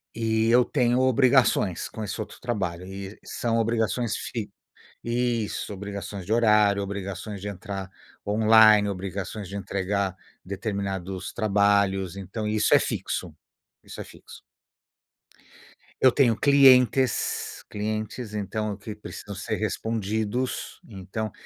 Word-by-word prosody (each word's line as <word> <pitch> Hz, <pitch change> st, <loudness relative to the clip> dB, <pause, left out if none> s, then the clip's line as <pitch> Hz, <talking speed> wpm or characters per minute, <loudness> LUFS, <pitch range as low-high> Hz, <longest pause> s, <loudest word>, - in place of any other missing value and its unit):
E 110 Hz, -1 st, +1 dB
eu 125 Hz, +2 st, +6 dB
tenho 125 Hz, -2 st, +1 dB
obrigações 130 Hz, -7 st, +3 dB
com 110 Hz, -, -6 dB
esse 100 Hz, 0 st, -4 dB
outro 110 Hz, -, -8 dB
trabalho 95 Hz, -7 st, -3 dB
e 95 Hz, +2 st, -8 dB
são 115 Hz, -1 st, -1 dB
obrigações 115 Hz, 0 st, 0 dB
fi 110 Hz, -4 st, -4 dB, 0.6 s
isso. 120 Hz, -3 st, -1 dB
Obrigações 100 Hz, -1 st, -6 dB
de 110 Hz, -, 0 dB
horário, 105 Hz, -3 st, +4 dB
obrigações 100 Hz, +1 st, -5 dB
de 100 Hz, -, -6 dB
entrar 100 Hz, -1 st, -6 dB, 0.4 s
online, 110 Hz, -1 st, +6 dB
obrigações 100 Hz, +1 st, -5 dB
de 100 Hz, -, -8 dB
entregar 100 Hz, 0 st, -2 dB, 0.3 s
determinados 95 Hz, -2 st, -4 dB
trabalhos. 100 Hz, -3 st, +2 dB
Então, 100 Hz, +3 st, -5 dB
isso 105 Hz, 0 st, +2 dB
é -, -, +8 dB
fixo. -, -, -3 dB, 0.5 s
Isso -, -, -9 dB
é -, -, -5 dB
fixo. -, -, -14 dB, 1.6 s
Eu 130 Hz, -, +7 dB
tenho 120 Hz, -5 st, +3 dB
clientes, 130 Hz, -2 st, +4 dB
clientes, 110 Hz, +2 st, -4 dB
então, 105 Hz, 0 st, -3 dB
que 105 Hz, +2 st, -8 dB
precisam 105 Hz, -1 st, -9 dB
ser 100 Hz, +3 st, -3 dB
respondidos, 110 Hz, +2 st, -2 dB
então 105 Hz, +1 st, -5 dB
105 Hz, 115 wpm, -25 LUFS, 100-115 Hz, 1.6 s, é